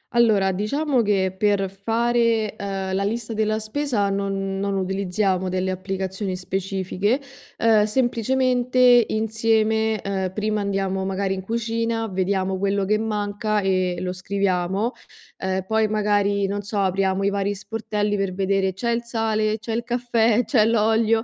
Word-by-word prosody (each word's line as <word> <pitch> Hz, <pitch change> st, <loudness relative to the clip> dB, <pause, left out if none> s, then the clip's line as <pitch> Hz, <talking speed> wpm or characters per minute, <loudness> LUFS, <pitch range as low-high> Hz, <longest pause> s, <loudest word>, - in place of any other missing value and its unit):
Allora, 215 Hz, -5 st, +4 dB
diciamo 255 Hz, +8 st, 0 dB
che 195 Hz, -3 st, +1 dB
per 195 Hz, -1 st, +1 dB
fare, 230 Hz, +2 st, +1 dB
uhm, 195 Hz, -1 st, -3 dB
la 195 Hz, +1 st, 0 dB
lista 225 Hz, +2 st, -2 dB
della 215 Hz, 0 st, 0 dB
spesa 220 Hz, -1 st, -1 dB
non 195 Hz, -1 st, -2 dB
non 200 Hz, 0 st, -1 dB
utilizziamo 190 Hz, 0 st, 0 dB
delle 185 Hz, +1 st, -1 dB
applicazioni 190 Hz, +1 st, -3 dB
specifiche. 190 Hz, +4 st, -1 dB, 0.4 s
Uhm, 220 Hz, -2 st, +4 dB
semplicemente 250 Hz, +1 st, +3 dB
insieme, 220 Hz, 0 st, +1 dB
uhm, 190 Hz, -2 st, -1 dB
prima 210 Hz, +1 st, -1 dB
andiamo 195 Hz, -1 st, -1 dB
magari 195 Hz, 0 st, -1 dB
in 190 Hz, -, -4 dB
cucina, 230 Hz, +2 st, -2 dB
vediamo 190 Hz, 0 st, -1 dB
quello 200 Hz, 0 st, 0 dB
che 215 Hz, +2 st, +1 dB
manca 210 Hz, -1 st, -1 dB
e 185 Hz, -2 st, +1 dB
lo 180 Hz, 0 st, -2 dB
scriviamo, 190 Hz, +2 st, -1 dB, 0.5 s
uhm, 190 Hz, 0 st, -1 dB
poi 220 Hz, 0 st, +2 dB
magari, 205 Hz, -1 st, +1 dB
non 200 Hz, +1 st, -2 dB
so, 205 Hz, +1 st, -5 dB
apriamo 195 Hz, 0 st, +1 dB
i 200 Hz, -, +3 dB
vari 200 Hz, 0 st, -1 dB
sportelli 210 Hz, 0 st, -2 dB
per 195 Hz, -2 st, -1 dB
vedere: 195 Hz, 0 st, +1 dB
c'è 235 Hz, +6 st, -2 dB
il 235 Hz, 0 st, 0 dB
sale, 220 Hz, -2 st, 0 dB
c'è 225 Hz, +1 st, -5 dB
il 235 Hz, +1 st, -1 dB
caffè, 235 Hz, -1 st, +1 dB
c'è 235 Hz, -7 st, +3 dB
l'olio, 225 Hz, 0 st, +2 dB
205 Hz, 145 wpm, -23 LUFS, 195-225 Hz, 0.5 s, Allora